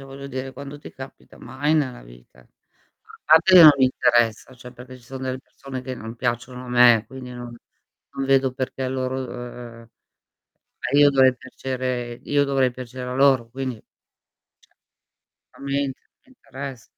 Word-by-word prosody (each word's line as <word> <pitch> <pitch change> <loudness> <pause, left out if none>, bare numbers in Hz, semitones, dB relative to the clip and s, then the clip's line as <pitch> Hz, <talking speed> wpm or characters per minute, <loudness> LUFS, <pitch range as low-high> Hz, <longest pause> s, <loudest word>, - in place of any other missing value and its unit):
voglio 135 +1 -10
dire, 130 0 -6
quando 140 +1 -9
ti - - -11
capita, 130 0 -12
mai 145 +4 -2
nella 130 - -1
vita. - - -18
A - - -25 0.8
parte 160 +4 +5
che 180 - +11
non 155 - +11
mi 135 - +4
interessa, 120 -2 +1
cioè, 125 0 -12
perché 130 +1 -12
ci 120 - -20
sono 130 +1 -8
delle 130 0 -3
persone 135 -1 -9
che 130 0 -5
non 115 0 -9
piacciono 125 +2 -3
a - - -10
me, 120 -2 +5
quindi 130 +1 -10
non 120 -1 -9 0.6
non 135 - -3
vedo 135 -1 +3
perché 130 0 -5
a 130 - -1
loro 130 0 -3
uhm, 130 - -5
uhm, 120 -1 -9
ma 115 0 -21 0.9
io 145 -1 +6
dovrei 130 -1 +4
piacere 130 -1 -4
io 145 0 +1
dovrei 135 -2 +1
piacere 125 0 -8
a - - -3
loro, 135 -3 +3
quindi, 130 0 -4
cioè 105 - -20 1.7
A - - -14
me 140 0 -1
int 135 -2 -3 0.3
interess 140 - -9
130 Hz, 175 wpm, -23 LUFS, 125-135 Hz, 1.7 s, che